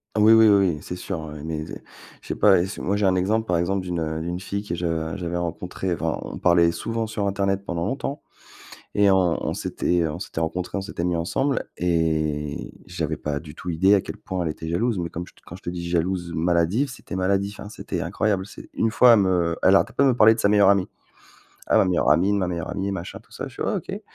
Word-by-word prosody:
Ah - - +1
oui, 110 +1 +7
oui, 110 0 +7
oui, 100 -3 +4
oui, - - -5
c'est 90 - -6
sûr, 90 -3 -5
heu, 75 0 -8
mais 80 -1 -3
je 85 - -13
sais - - -2
pas 95 -3 +5
et 85 - +1
si 100 - -7
moi, 100 +3 0
j'ai 105 - +1
un 95 -1 +3
exemple, 110 +5 0
par 90 - +2
exemple, 95 +3 0
d'une 90 -2 -3
heu, 80 0 -2
d'une 85 +2 -4
fille 100 +2 -3
que 95 -5 -4
je 80 -2 -2
j'avais 85 -2 -3
rencontré, 90 +2 -3
enfin, 80 -1 -2
on - - -7
parlait 85 -1 +4
souvent 115 +2 -3
sur 105 -2 -2
internet 100 0 0
pendant 85 -3 -3
longtemps 140 +4 -3 0.7
et 100 -1 +4
on 95 -3 +2
on - - -2
s'était 85 -2 0
on 80 +1 -4
s'était 90 -3 -5
rencontré, 85 +4 -2
on 100 - -2
s'était 95 -3 -5
mis 90 -1 0
ensemble 135 +12 -1
et 80 -4 -1
j'avais - - -3
pas 75 -1 -3
du 75 -2 -11
tout 90 - -6
idée 95 +5 +4
à 100 - +3
quel - - -8
point 95 -1 -4
elle 80 - -1
était 80 +1 -6
jalouse, 110 +6 0
mais 85 -1 -2
comme 85 +1 -6
je - - -17
te - - -24
quand 85 - -9
je 95 - -18
te - - -4
dis: 85 -1 -5
«Jalouse, 85 0 -1
maladive,» 85 - +1
c'était 120 - -8
maladif, 100 +2 0
hein, 105 - -8
c'était 110 - -5
incroyable. 100 -3 0
C'est, 105 - -12
1 115 - +1
fois, 120 +1 +7
elle 110 - +4
me 95 - +2 0.2
heu, - - -4
elle 95 - +6
arrêtait - - +1
pas - - +2
de - - +5
me 130 - +3
parler 110 -1 +7
de 115 - -4
sa 100 - +3
meilleure 105 -2 +5
amie, 100 -2 +3 0.8
ah - - +4
ma - - +4
meilleure 90 -2 +2
amie, 95 +4 +3
ma 95 -3 0
meilleure 85 -2 -4
amie 100 0 -2
et - - -2
machin 90 -2 -6
tout - - -30
ça, - - -6
je - - -14
fais: - - -9
«Ouais, - - 0
OK». - - -6
90 Hz, 260 wpm, -24 LUFS, 85-100 Hz, 0.8 s, oui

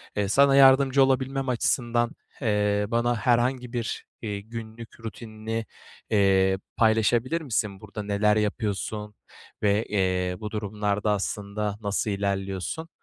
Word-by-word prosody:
eee, 100 -1 0
sana 140 +5 +5
yardımcı 135 0 +6
olabilmem 135 0 0
açısından, 120 -1 +1 0.3
eee, 105 -2 +1
bana 120 +1 +1
herhangi 120 +2 +1
bir, 115 -2 -3 0.2
eee, 105 -3 -4
günlük 115 +1 -9
rutinini, 110 0 -5 0.4
eee, 95 -2 +3 0.2
paylaşabilir 115 +7 +2
misin 105 -8 -2
burada? 105 0 -7
Neler 105 +1 +2
yapıyorsun 105 0 -2 0.5
ve, 105 +2 +2
eee, 95 -2 0
bu 105 -1 -6
durumlarda 105 0 -1
aslında 105 +1 -2
nasıl 100 +1 -1
ilerliyorsun? 100 - -3
110 Hz, 115 wpm, -26 LUFS, 100-120 Hz, 0.5 s, yardımcı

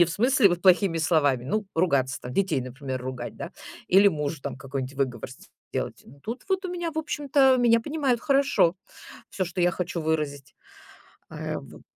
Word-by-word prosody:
не - - +8
в 170 - -5
смысле 240 +3 +4
вот 175 -1 -1
плохими 180 -2 +4
словами, 145 -6 +2
ну, 210 +10 -1
ругаться 140 -7 +1
там: 125 - -7
детей, 185 -7 +1
например, 130 +1 -5
ругать, 125 -1 -6
да, - - -7 0.3
или 195 +2 +6
мужу 150 -3 -3
там - - -5
какой-нибудь 135 0 -5
выговор 130 -3 -2
с - - -13 0.3
сделать. - - -3
Но 140 +5 -16
тут 230 - -6
вот 380 0 0
у - - -2
меня, 345 -2 -3
в 315 - -5
общем-то, 280 -3 +3
меня 235 -1 +5
понимают 270 -1 -1
хорошо, 275 - +3 0.6
всё, 190 - -2
что 180 0 -4
я 175 0 +4
хочу 175 -1 -3
выразить. 150 -3 -2 0.8
Э, - - -4
вот. - - -11
175 Hz, 185 wpm, -26 LUFS, -, 0.8 s, не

